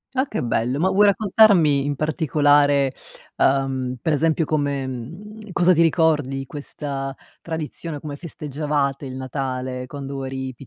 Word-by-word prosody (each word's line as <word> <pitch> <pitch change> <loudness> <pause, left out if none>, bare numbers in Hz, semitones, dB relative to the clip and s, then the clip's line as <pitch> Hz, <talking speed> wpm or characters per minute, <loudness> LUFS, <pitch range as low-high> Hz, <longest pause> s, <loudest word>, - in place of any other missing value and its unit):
Ah 260 +2 +1
che 215 - -3
bello, 120 +2 0
ma 180 +5 +2
vuoi 205 +2 +5
raccontarmi 195 -8 +4
in 145 0 -1
particolare, 145 -2 +2 0.4
uhm, 135 -2 +1
per 155 +6 0
esempio 160 +2 +1
come 145 -3 -1
mhmm, 185 - -8
cosa 180 +1 +4
ti 165 - +3
ricordi 160 -5 +2
di 135 - -4
questa 140 -1 -5 0.3
tradizione, 160 -1 -5
come 145 0 -6
festeggiavate 145 -3 -3
il 130 - -7
Natale 130 -1 -4
quando 140 0 -6
eri, 130 0 -5
145 Hz, 140 wpm, -22 LUFS, 135-160 Hz, 0.4 s, vuoi